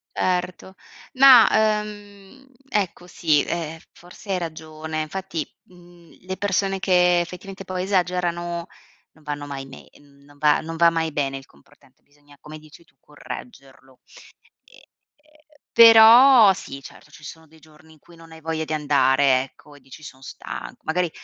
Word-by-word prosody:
Erto 180 +1 -3 0.4
ma, 260 -3 +7 0.3
ehm, 205 +4 -13 0.2
ecco, 190 -6 -3
sì, 155 -5 0
ehm, 165 -1 -5
f - - -24
forse 180 +3 -12
hai 185 - 0
ragione 160 -1 -6
infatti, 170 +1 -6 0.2
mhmm, 175 -2 -20 0.2
le 190 0 -6
persone 195 -1 -1
che 180 -2 +2
effettivamente 190 +3 -9
poi 185 -1 -5
esagerano 175 -2 -2 0.4
non 155 - -25
vanno 145 -1 -6
mai 140 -1 -7
nei 135 -1 -15
n 140 -1 -24
non 145 0 -21
va 150 0 +2
non 165 +1 -8
va 170 +1 +4
mai 165 -1 -2
bene 135 -2 -3
il 135 - -13
comportante 70 - -26
bisogna, 145 0 -24
come 155 +3 -11
dici 155 +2 -18
tu, - - -33
correggerlo. 135 - -13 0.7
Ehm, - - -21 0.9
però 230 0 +8
sì, 140 -6 -10
certo, - - -15
ci 150 - -17
sono 160 +1 -12
dei 160 +1 -22
giorni 155 +1 -21
in 155 - -23
cui 170 - -20
non 165 0 -17
hai 160 0 -14
voglia 160 0 -4
di 155 - -5
andare, 140 -3 +2
ecco, 145 +2 -17
e - - -17
dici: 135 +4 -15
"Son 130 -3 -13
stanco." - - -10
Magari 175 +2 -1
165 Hz, 160 wpm, -22 LUFS, 150-185 Hz, 0.9 s, però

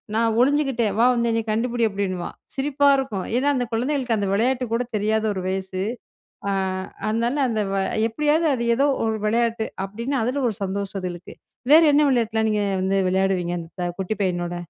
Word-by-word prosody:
நான் 225 0 +2
ஒளிஞ்சுகிட்டேன் 265 -6 +1
வா 235 - +5
வந்து 235 -1 +1
என்னை 225 - +1
கண்டுபிடி 235 +2 0
அப்டின்னுவான், 190 -3 -3 0.2
சிரிப்பா 285 +1 +1
இருக்கும். 225 -9 -3
ஏனா, 265 +3 +1
அந்த 250 -1 0
குழந்தைகளுக்கு 250 -1 0
அந்த 200 - -1
விளையாட்டு 250 +5 +1
கூட 235 +2 +1
தெரியாத 215 +1 0
ஒரு 190 -2 -4
வயசு. 190 0 -3 0.7
அ - - +1 0.6
அதனால 235 +5 0
அந்த 220 -2 0
வ - - 0 0.3
எப்டியாவது 300 +6 +1
அது 235 -1 -2
ஏதோ 275 +4 +3 0.2
ஒரு 220 -1 0
விளையாட்டு 230 0 0 0.2
அப்டின்னு 235 +6 -3
அதுல 260 +4 -1
ஒரு 215 - -5
சந்தோஷம் 195 0 -3
அதுகளுக்கு. 180 -1 -7 0.4
வேற 320 - +9
என்ன 295 +1 +5
விளையாட்டுலா 225 -4 +1
நீங்க 210 -1 +1 0.2
வந்து 195 +1 +1
விளையாடுவீங்க 185 -2 0
அந்த 175 +2 -6
குட்டி 190 +3 -1
பையனோட? 175 -2 -1
225 Hz, 165 wpm, -23 LUFS, 195-250 Hz, 0.7 s, வேற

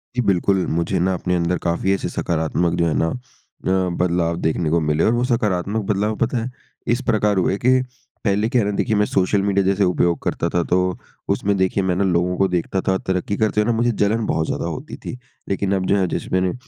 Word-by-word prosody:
जी 125 - +2
बिल्कुल। 95 -2 +2
मुझे 85 +3 0
ना 95 +2 +1
अपने 90 0 -1
अंदर 85 +1 0
काफ़ी 85 +3 0
ऐसे 95 - -2
सकारात्मक 85 +1 -1
जो 85 - +3
है 80 - 0
ना 80 - +2
अ, 95 -6 -3
बदलाव 85 -1 +1
देखने 80 0 0
को 85 +2 +2
मिले 75 0 +1
और - - +4
वो 120 +1 +1
सकारात्मक 105 -3 0
बदलाव 105 +2 0
पता 120 +2 0
है 115 +2 -2 0.4
इस 120 - -1
प्रकार 105 -2 +2
हुए 95 +1 +1
कि 130 +3 +3 0.4
पहले 105 0 +1
क्या 120 0 +2
है - - 0
ना? 105 - -2
देखिए, 110 - +1
मैं 105 0 +3
सोशल 95 0 +1
मीडिया 100 -1 +1
जैसे 100 +1 +2
उपयोग 90 -2 +2
करता 85 - -1
था 85 0 0
तो, 90 +1 0 0.3
उसमें 100 0 +1
देखिए 95 +1 +1
मैं 90 -1 +1
ना 100 - +1
लोगों 90 -1 +1
को 95 - +3
देखता 90 +1 -1
था 95 - +3
तरक्की 95 +2 -1
करते 110 -1 +2
हुए - - 0
ना - - 0
मुझे 120 +1 +2
जलन 110 +1 0
बहुत 80 0 0
ज़्यादा - - -2
होती - - -5
थी। - - -5 0.3
लेकिन 100 0 0
अब 95 -1 -1
जो 100 - +2
है 95 -2 +1
जैसे - - -4
मैंने 95 0 +2
अ, - - -3
95 Hz, 235 wpm, -21 LUFS, 90-105 Hz, 0.4 s, और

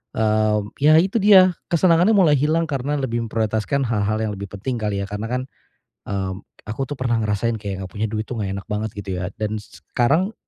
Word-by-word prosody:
eee, 110 -1 +2 0.2
ya 150 +2 +5
itu 195 +6 +1
dia, 190 -2 +7 0.2
kesenangannya 175 +4 +4
mulai 175 -6 +5
hilang 160 +3 +2
karena 140 +1 -1
lebih 120 -4 -2
memprioritaskan 110 +5 -1
hal-hal 110 -2 0
yang 105 - -1
lebih 100 +1 -6
penting 120 +4 -3
kali 100 -2 -2
ya. - - -3
Karena 105 +2 -4
kan, 125 +1 -1 0.7
mmm, 95 -1 -3 0.2
aku 110 +5 -3
tuh 145 - -6
pernah 120 -2 0
ngerasain 105 +2 0
kayak 100 -3 -5
enggak 90 - -9
punya 110 +2 -1
duit 110 0 -3
tuh 125 - -5
enggak 100 0 -3
enak - - -14
banget 105 0 -3
gitu 95 -2 -4
ya 90 - -3
dan 110 0 -2
s - - -17 0.2
sekarang 160 - +2
110 Hz, 205 wpm, -21 LUFS, 105-145 Hz, 0.7 s, dia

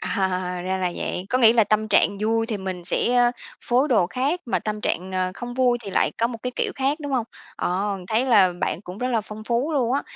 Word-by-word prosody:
Ờ, 190 -3 0 0.3
ra 190 +1 -1
là 180 -1 -1
vậy. 180 +2 -4
Có 255 - +2
nghĩ 230 -3 +7
là 230 -2 +4
tâm 215 +1 0
trạng 200 -1 +3
vui 225 +1 +1
thì 225 -3 -2
mình 185 -2 -5
sẽ, 245 +6 +1
ơ, 245 -1 +5 0.3
phối 255 +5 +1
đồ 220 -9 +3
khác, 275 - -1
mà 235 - +1
tâm 215 0 -4
trạng, 185 -1 -2
ờ, 185 0 0
không 245 0 -7
vui 250 -2 +2
thì 195 - -5
lại - - +1
có 230 - +3
một 235 -1 -6
cái 250 - -2
kiểu - - 0
khác, 280 +3 -1
đúng 285 -2 -5
hông? 245 -3 +1 0.3
À, - - -1 0.4
thấy 230 +4 +1
là 200 -7 +5
bạn - - -1
cũng 185 0 -9
rất 250 - -1
là 235 -3 +1
phong 215 +1 -10
phú 245 +7 0
luôn 255 -4 +1
á. 280 - +1
225 Hz, 255 wpm, -23 LUFS, 195-250 Hz, 0.4 s, nghĩ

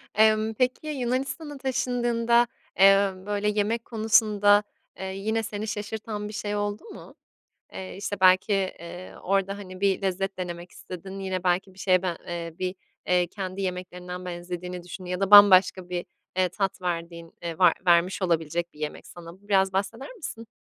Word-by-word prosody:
Emm, 215 +1 +4
peki, 255 +6 0
Yunanistan'a 275 +2 -3
taşındığında, 240 -2 +1 0.3
emm, 195 0 +4
böyle, 205 0 0
yemek 215 +3 0
konusunda, 215 -2 +4 0.4
eee, 190 - -4
yine 220 +3 -1
seni 215 0 -4
şaşırtan 210 0 -4
bir 210 - -8
şey 210 0 -3
oldu 205 0 -2
mu? 445 - -12 0.6
Eee, 190 0 -7
işte, 205 -1 -4
belki, 185 +3 +5
eee, 185 -2 -3
orada, 195 +1 0
hani, 185 -2 -10
bir 195 -1 +1
lezzet 195 +1 -2
denemek 175 -1 -5
istedin, 190 +2 -8
yine, 185 -1 -3
belki, 185 +1 0
bir - - -20
şeye 185 -1 +3
ben 180 -3 -2
eee, 170 -1 -5
bir, 185 0 -2 0.3
eee, 180 -1 +3
kendi 190 +1 -5
yemeklerinden 180 0 -5
benzediğini 180 0 -6
düşündüğün 180 +1 -8
ya 180 +1 -2
da 195 - 0
bambaşka 190 -3 +8
bir, 180 -1 -3 0.3
eee, 185 -1 +3
tat 195 0 -3
verdiğin 170 -1 -4
eee 170 -1 -5
var 180 -3 +6
vermiş 175 +3 +3
olabilecek 170 -1 -1
bir 150 - -16
yemek 150 -1 -5
sana. 170 -1 -11
Bu 205 - -22
biraz 190 -1 +3
bahseder 225 - -3
misin? 230 - -7
195 Hz, 165 wpm, -26 LUFS, 180-210 Hz, 0.6 s, bambaşka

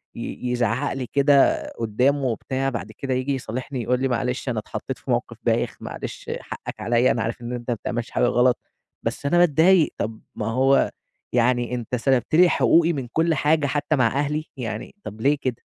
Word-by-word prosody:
ي 125 - -4
يزعّق 120 +3 0
لي 130 -2 -4
كده 140 -1 +4 0.2
قدّامه 125 +6 +1
وبتاع، 130 +3 -1
بعد 115 -3 -5
كده 130 +4 -3
ييجي 130 +2 0
يصالحني 130 +1 -4
يقول 125 +2 +1
لي 135 - +2
معلش 125 +1 -1
أنا 115 - -1
اتحطّيت 105 - -6
في - - -5
موقف - - -1
بايخ، - - 0
معلش - - -6
حَقك - - -8
عليّا، 120 +1 +3
أنا 115 - 0
عارف 115 +1 -4
إن 120 +1 -5
أنت 120 0 -6
ما - - +1
بتعملش 120 +2 -4
حاجة - - 0
غلط 125 +1 +3 0.5
بس - - -3
أنا 160 +5 +3
باتضايق، 175 +1 +5
طب 110 +1 -4
ما 105 - -3
هو 130 +4 +3 0.4
يعني 120 0 +2
أنت 120 +1 -3
سَلبت 130 +3 +1
لي 180 +2 +7
حقوقي 170 0 +4
من 135 -4 -4
كل 165 +1 +2
حاجة 150 +1 +2
حتى 145 +2 0
مع 125 -4 +3
أهلي، 145 +5 -1
يعني 115 - -5
طب 110 +2 -8
ليه 145 +4 +3
كده؟ 125 -3 -3
130 Hz, 190 wpm, -23 LUFS, 120-140 Hz, 0.5 s, لي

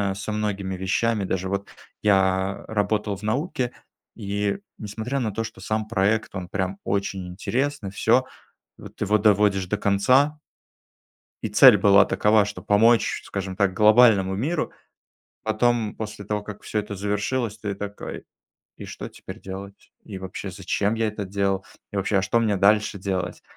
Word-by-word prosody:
со 100 +2 -5
многими 100 -3 -2
вещами, 100 +3 0
даже 95 0 -2
вот 100 0 -3 0.3
я 95 -1 +2
работал 105 -1 0
в 105 - -15
науке, 125 +2 -1 0.4
и, 100 - -2 0.2
несмотря 110 +6 -4
на 110 -3 -1
то, 115 +2 -2
что 95 - -10
сам 110 +2 -2
проект, 105 -1 0
он 90 -1 -5
прям 95 0 -2
очень 100 -2 -2
интересный, 120 +3 -2
всё, 120 +5 +3 0.5
вот - - -13
его 105 +1 +2
доводишь 100 -2 +3
до 105 +3 -2
конца 130 +10 +3 1.0
и 110 - -1
цель 120 +3 +8
была 100 0 +6
такова, 105 0 +3
что 105 +1 -7
помочь, 115 +3 +3
скажем 95 -1 -5
так, 95 -2 +1
глобальному 105 -3 +5
миру. 145 - -1 0.7
Потом, 110 0 +1
после 105 -2 -6
того 105 0 -2
как 105 0 -9
всё 105 - -2
это 105 0 -4
завершилось, 105 +3 -2
ты 105 -2 -4
такой: 100 +1 -7 0.5
"И - - -9
что - - -7
теперь - - -11
делать? 95 +1 -9
И 95 -3 -7
вообще, 95 -1 -6
зачем 105 +2 -1
я 115 -1 0
это 105 -1 -4
делал? 95 0 -1 0.3
И - - -5
вообще, 100 +1 +1
а - - +1
что 105 +5 +1
мне 105 -3 +1
дальше 105 +1 +3
делать?" 90 -2 -3
105 Hz, 160 wpm, -24 LUFS, 95-110 Hz, 1.0 s, цель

